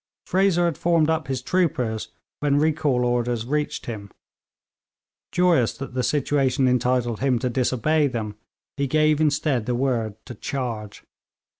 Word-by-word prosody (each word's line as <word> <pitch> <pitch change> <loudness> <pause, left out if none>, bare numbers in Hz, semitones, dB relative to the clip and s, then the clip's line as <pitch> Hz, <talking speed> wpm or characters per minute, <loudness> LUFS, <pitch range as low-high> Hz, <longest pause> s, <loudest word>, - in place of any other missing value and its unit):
Fraser 185 -2 +2
had 170 -4 -1
formed 165 -2 +3
up 160 -3 -1
his 130 -2 -3
troopers 125 -12 0 0.3
when 145 -1 +2
recall 150 -4 +1
orders 120 -1 0
reached 150 +3 -2
him. 105 -4 -6 1.2
Joyous 175 -10 +2
that 135 -2 -7
the 130 - 0
situation 135 0 +1
entitled 125 -2 +1
him 130 -2 +2
to 125 +1 -2
disobey 135 +5 +1
them, 110 -5 -4 0.4
he 140 0 0
gave 155 +2 +3
instead 145 -6 +1
the 125 - 0
word 120 -5 -1
to 125 - -8
charge. 115 -4 -5
130 Hz, 140 wpm, -24 LUFS, 120-150 Hz, 1.2 s, formed